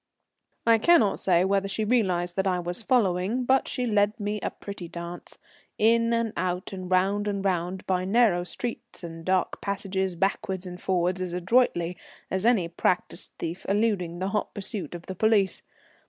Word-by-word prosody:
I 230 -1 +5
cannot 230 - +4
say 180 -1 +3
whether 195 0 +1
she 195 +3 -2
realized 185 -7 +1
that 190 0 +1
I 185 -1 +2
was 175 +3 -1
following, 215 0 +1
but 265 +2 +3
she 250 - -1
led 210 0 +2
me 210 0 -2
a - - -1
pretty 200 -4 -8
dance. 170 +1 -8 0.4
In 230 +1 +3
and 230 -2 0
out, 180 +2 -2
and 185 -1 -6
round 195 +3 +2
and 200 -1 -2
round, 185 0 -1
by 185 -1 0
narrow 195 -3 +3
streets 230 +2 -6
and 165 -1 -7
dark 185 +1 0
passages, 190 -2 -2
backwards 190 0 -1
and 180 0 -8
forwards, 185 0 0
as 180 -1 -3
adroitly 180 -2 +2 0.3
as 190 +4 +1
any 215 -8 +3
practised 175 +1 -1
thief 170 +3 -5
eluding 200 -5 +1
the 190 +2 -2
hot 210 +1 -2
pursuit 195 -5 -4
of 170 - -9
the 190 - -5
police. 205 -1 +2
190 Hz, 170 wpm, -26 LUFS, 180-210 Hz, 0.4 s, I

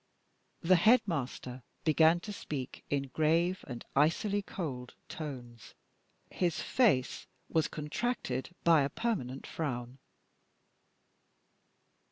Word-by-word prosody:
The 185 +2 +5
headmaster 165 - +1 0.2
began 160 +1 +5
to 210 - -6
speak 140 -9 -6
in 140 -1 -1
grave 165 +6 +1
and 120 -3 -7
icily 185 +8 +2
cold 135 -11 -6
tones; 125 -7 -8 0.6
his 175 -2 0
face 200 - +2 0.2
was 160 -1 +2
contracted 150 - -3
by 165 -3 +6
a 140 - +1
permanent 140 - -2
frown. 125 -4 -4
155 Hz, 95 wpm, -32 LUFS, 130-175 Hz, 0.6 s, by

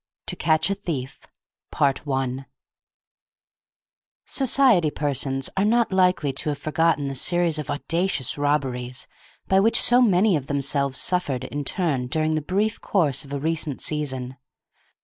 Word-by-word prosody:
TO - - -1
CATCH 160 +3 +1
A - - +2
THIEF 145 -10 -6 0.5
I 135 -2 -1 1.8
Society 255 - +3
persons 135 -2 -2
are 195 - +1
not 230 +1 +2
likely 180 -7 +2
to 150 - -1
have 145 - -2
forgotten 155 0 0
the 135 - -3
series 170 +3 +1
of 150 - -6
audacious 155 -2 -1
robberies 135 -4 -2 0.4
by 190 - +3
which 225 +4 +3
so 245 +1 +5
many 200 -3 +3
of 140 -3 -3
themselves 140 -1 0
suffered 145 -9 0
in 145 +2 -5
turn 140 -5 -1
during 155 +4 0
the 155 - -1
brief 205 +8 -1
course 160 -9 +1
of 140 - -14
a 140 - -2
recent 155 -2 -2
season. 130 -4 -3
150 Hz, 140 wpm, -23 LUFS, 135-180 Hz, 1.8 s, so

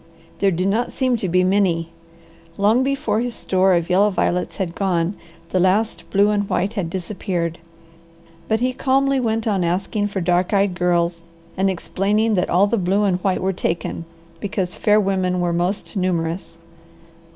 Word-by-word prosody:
There 200 - +3
did 185 +1 0
not 225 +5 0
seem 255 -2 +1
to 190 -4 -3
be 180 +2 +3
many. 185 -4 +1 0.7
Long 215 +5 +3
before 260 -6 0
his 240 -1 -2
store 190 0 +2
of 170 -1 0
yellow 195 +3 +4
violets 180 -2 -1
was 190 -4 -2
gone 180 0 -1 0.3
the 185 - 0
last 195 +5 +1
blue 200 +1 +3
and 205 -1 -1
white 200 +3 0
had 190 -6 -2
disappeared. 175 -2 -3 0.9
But 220 +1 0
he 255 +1 +1
calmly 270 +1 +1
went 225 -2 -1
on 195 -4 +1
asking 195 +4 -1
for 200 -1 -3
dark 180 +2 +1
eyed 200 -1 +2
girls, 175 -1 0 0.3
and 195 +1 +1
explaining 205 +4 0
that 180 -3 0
all 185 +4 +4
the 205 +3 0
blue 195 +3 +1
and 190 -3 +2
white 185 0 0
were 190 +1 +1
taken, 170 -1 -3 0.3
because 190 -2 -2
fair 210 0 +3
women 185 -2 0
were 175 -1 0
most 180 +6 -2
numerous. 175 -2 -2
190 Hz, 170 wpm, -21 LUFS, 180-210 Hz, 0.9 s, yellow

